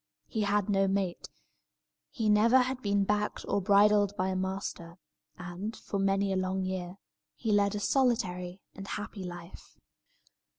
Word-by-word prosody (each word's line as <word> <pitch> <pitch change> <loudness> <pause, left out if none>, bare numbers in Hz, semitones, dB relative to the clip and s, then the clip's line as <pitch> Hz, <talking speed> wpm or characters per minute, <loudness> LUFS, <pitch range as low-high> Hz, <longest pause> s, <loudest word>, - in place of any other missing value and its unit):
He 220 - -3
had 205 -1 +1
no 195 -1 +2
mate; 190 -2 -2 0.8
he 225 -6 -2
never 215 +4 +5
had 255 0 +1
been 200 -2 +1
backed 210 +1 -1
or 200 - +1
bridled 205 +1 +4
by 185 +1 0
a 190 - -1
master; 190 -2 -4 0.4
and, 180 +5 -6
for 200 - -4
many 195 0 +1
a - - 0
long 185 0 -1
year, 185 0 -4 0.4
he 225 - -2
led 205 0 +3
a - - -2
solitary 195 -8 0
and 195 0 -9
a - - -3
happy 205 -1 -7
life. 175 0 -10
200 Hz, 160 wpm, -30 LUFS, 185-210 Hz, 0.8 s, never